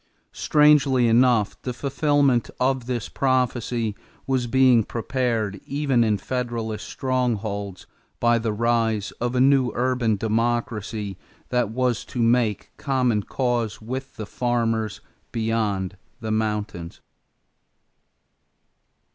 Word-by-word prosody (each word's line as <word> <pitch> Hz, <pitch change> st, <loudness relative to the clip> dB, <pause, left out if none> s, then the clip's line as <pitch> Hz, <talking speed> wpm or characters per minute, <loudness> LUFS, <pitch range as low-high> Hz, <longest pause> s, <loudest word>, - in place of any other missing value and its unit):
Strangely 145 Hz, -4 st, +4 dB
enough 115 Hz, -2 st, +3 dB
the 125 Hz, -, -4 dB
fulfillment 140 Hz, -2 st, +1 dB
of 130 Hz, -1 st, 0 dB
this 120 Hz, -3 st, -2 dB
prophecy 120 Hz, -4 st, 0 dB, 0.3 s
was 130 Hz, -2 st, 0 dB
being 130 Hz, -2 st, +5 dB
prepared 115 Hz, -4 st, -2 dB
even 140 Hz, -4 st, +1 dB
in 110 Hz, -2 st, +2 dB
Federalist 115 Hz, -2 st, -4 dB
strongholds 110 Hz, -7 st, -2 dB, 0.3 s
by 120 Hz, 0 st, +3 dB
the 115 Hz, -1 st, -1 dB
rise 115 Hz, -1 st, 0 dB
of 120 Hz, +1 st, -1 dB
a -, -, +2 dB
new 135 Hz, -1 st, +4 dB
urban 125 Hz, -3 st, +1 dB
democracy 110 Hz, -2 st, -2 dB, 0.3 s
that 125 Hz, -4 st, +1 dB
was 125 Hz, 0 st, 0 dB
to 125 Hz, -, -7 dB
make 115 Hz, -3 st, +1 dB
common 125 Hz, -6 st, +1 dB
cause 120 Hz, -1 st, -1 dB
with 130 Hz, +4 st, -6 dB
the 110 Hz, -, -6 dB
farmers 115 Hz, -3 st, -1 dB, 0.3 s
beyond 110 Hz, -5 st, -1 dB, 0.2 s
the 110 Hz, -2 st, -4 dB
mountains. 105 Hz, -6 st, -2 dB
120 Hz, 105 wpm, -24 LUFS, 110-130 Hz, 0.3 s, being